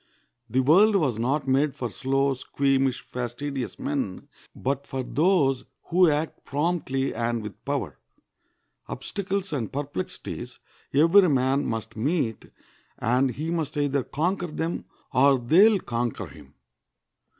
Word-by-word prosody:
The 130 +4 +2
world 190 +11 +5
was 135 - +1
not 135 +4 0
made 135 +2 +2
for 120 -3 -4
slow, 135 +7 +1
squeamish, 135 0 0
fastidious 125 +2 -5
men, 135 -10 -3 0.3
but 140 +1 -2
for 130 -1 -3
those 145 -3 +2 0.3
who 180 0 +5
act 150 +1 -2
promptly 145 -3 -1
and 115 0 -1
with 105 -3 -9
power. - - -3 0.9
Obstacles 195 -2 -3
and 120 -7 -2
perplexities 140 -9 -5 0.3
every 165 +6 +6
man 135 0 +2
must 115 -2 -4
meet, 130 -1 -1 0.5
and 125 +3 +2
he 155 +7 -4
must 160 -4 -2
either 145 -1 +1
conquer 175 +7 -1
them 165 +1 -3 0.3
or 135 +1 +5
they 165 - +6
will 210 -3 +2
conquer 120 -5 -3
him. - - -15
140 Hz, 130 wpm, -26 LUFS, 125-160 Hz, 0.9 s, every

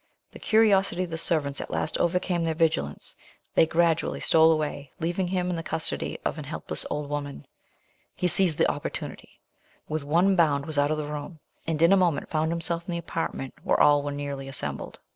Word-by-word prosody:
The - - -12
curiosity 195 -5 +3
of 175 - -6
the 160 - -3
servants 150 -5 0
at - - -7
last - - -2
overcame 175 0 +1
their 165 -1 -1
vigilance, 155 - -1 0.4
they 160 - +5
gradually 165 0 +1
stole 160 0 +5
away, 150 -3 -2
leaving 175 +3 -1
him 180 0 -1
in - - -1
the 165 - -3
custody 160 0 -2
of - - -2
an - - -5
helpless - - -3
old 150 -1 -3
woman. 145 -1 -5 0.7
He 180 - 0
seized 180 -2 +2
the - - +3
opportunity, - - -7 0.5
with 155 -1 -3
one 175 +7 +3
bound 145 -5 +2
was 155 -2 -2
out 145 0 +3
of 155 - 0
the 150 - -3
room, 150 +2 -6 0.3
and 160 -2 -1
in 170 +3 +6
a - - +6
moment 175 -6 +1
found 160 0 0
himself 170 0 0
in 175 - -3
the - - -1
apartment 165 -5 -4
where - - +1
all 145 0 +5
were 145 0 -4
nearly 140 -1 -5
assembled. 135 - -5
160 Hz, 200 wpm, -26 LUFS, 145-175 Hz, 0.7 s, in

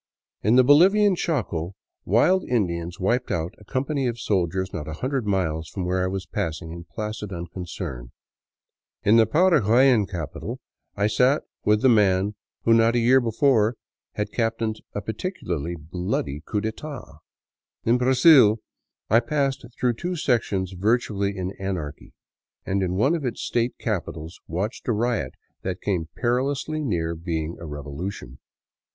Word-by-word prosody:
In 110 +4 +3
the 130 - +7
Bolivian 190 +9 +6
Chaco 100 - -2 0.3
wild 175 - +3
Indians 85 -7 -1
wiped 120 +7 0
out 85 +2 -2
a - - -15
company 135 +4 -1
of 120 -1 -3
soldiers 95 -2 -1
not 75 - -5
a 80 - -4
hundred 130 - -2
miles 80 -5 -1
from 95 - -4
where 90 +1 0
I - - +1
was 95 -1 -3
passing 80 +1 -4
in 85 0 -8
placid 105 +1 -5
unconcern. 85 -8 -6 0.9
In 110 +3 +5
the 115 - +5
Paraguayan 130 - +4
capital 85 -6 -5 0.4
I 100 - +1
sat 125 +7 +3 0.2
with 105 0 +3
the - - +6
man 100 -3 +3 0.3
who 115 - +4
not 115 +1 +4
a - - +4
year 125 +3 +5
before 115 -1 +2 0.4
had 105 0 -3
captained 115 -1 -1
a 105 - -2
particularly 90 - -3
bloody 80 -3 -3
coup 105 +5 -2
d'etat. 110 - -6 0.6
In 120 +2 +3
Brazil 130 -3 +6 0.5
I 115 - +5
passed 135 +2 -1 0.2
through 125 -1 +2
two 175 +9 -4
sections 110 - 0
virtually 100 0 0
in 95 0 -3
anarchy, 90 -7 -5 0.5
and 95 +1 0
in 90 -1 -1
one 135 - +3
of 165 -4 -2
its 125 -3 -3
state 120 +1 0
capi 105 -6 -2
tals 80 +1 -8
watched 95 +8 -4
a 120 - +2
riot 110 - -1 0.3
that 95 0 -3
came 85 -6 -2
perilously 135 +5 0
near 85 - -1
being 80 -1 -3
a 85 - -7
revolution. 75 -1 -6
105 Hz, 150 wpm, -24 LUFS, 90-125 Hz, 0.9 s, the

